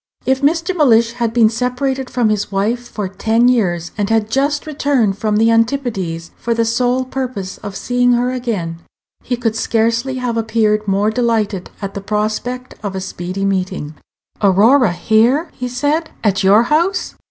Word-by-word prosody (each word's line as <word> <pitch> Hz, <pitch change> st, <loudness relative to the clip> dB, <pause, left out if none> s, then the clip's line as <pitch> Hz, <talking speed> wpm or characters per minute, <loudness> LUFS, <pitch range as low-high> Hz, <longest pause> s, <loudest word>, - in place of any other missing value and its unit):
If 265 Hz, +1 st, +1 dB
Mr. 330 Hz, +5 st, +1 dB
Mellish 235 Hz, -8 st, +4 dB
had 235 Hz, -2 st, -1 dB
been 230 Hz, -1 st, +4 dB
separated 250 Hz, +2 st, -2 dB
from 240 Hz, -4 st, +1 dB
his 210 Hz, -1 st, -1 dB
wife 225 Hz, +5 st, -1 dB
for 205 Hz, -2 st, -4 dB
ten 225 Hz, +5 st, +1 dB
years, 175 Hz, -9 st, +1 dB
and 205 Hz, 0 st, 0 dB
had 225 Hz, -1 st, +1 dB
just 285 Hz, +4 st, 0 dB
returned 275 Hz, -9 st, 0 dB
from 215 Hz, -1 st, 0 dB
the 225 Hz, +1 st, +4 dB
Antipodes 225 Hz, -9 st, -1 dB
for 235 Hz, -1 st, -1 dB
the 230 Hz, 0 st, +1 dB
sole 245 Hz, +3 st, +1 dB
purpose 250 Hz, -8 st, -5 dB
of 200 Hz, -1 st, -7 dB
seeing 245 Hz, +2 st, +1 dB
her 245 Hz, +1 st, +1 dB
again, 210 Hz, -10 st, -3 dB, 0.4 s
he 245 Hz, -, -2 dB
could 225 Hz, -2 st, -1 dB
scarcely 230 Hz, +4 st, 0 dB
have 250 Hz, -2 st, -2 dB
appeared 215 Hz, -2 st, +1 dB
more 200 Hz, +2 st, +2 dB
delighted 220 Hz, -5 st, -1 dB
at 195 Hz, 0 st, -4 dB
the 200 Hz, -, -5 dB
prospect 215 Hz, +5 st, -3 dB
of 200 Hz, -3 st, -4 dB
a -, -, -2 dB
speedy 185 Hz, +1 st, -4 dB
meeting. 185 Hz, -5 st, -2 dB, 0.5 s
"Aurora 215 Hz, +4 st, +4 dB
here!" 230 Hz, -, +2 dB
he 250 Hz, -, -5 dB
said; 290 Hz, +6 st, -1 dB
"at 195 Hz, -2 st, +1 dB
your 205 Hz, +4 st, +6 dB
house? 330 Hz, +9 st, 0 dB
230 Hz, 165 wpm, -17 LUFS, 205-250 Hz, 0.5 s, your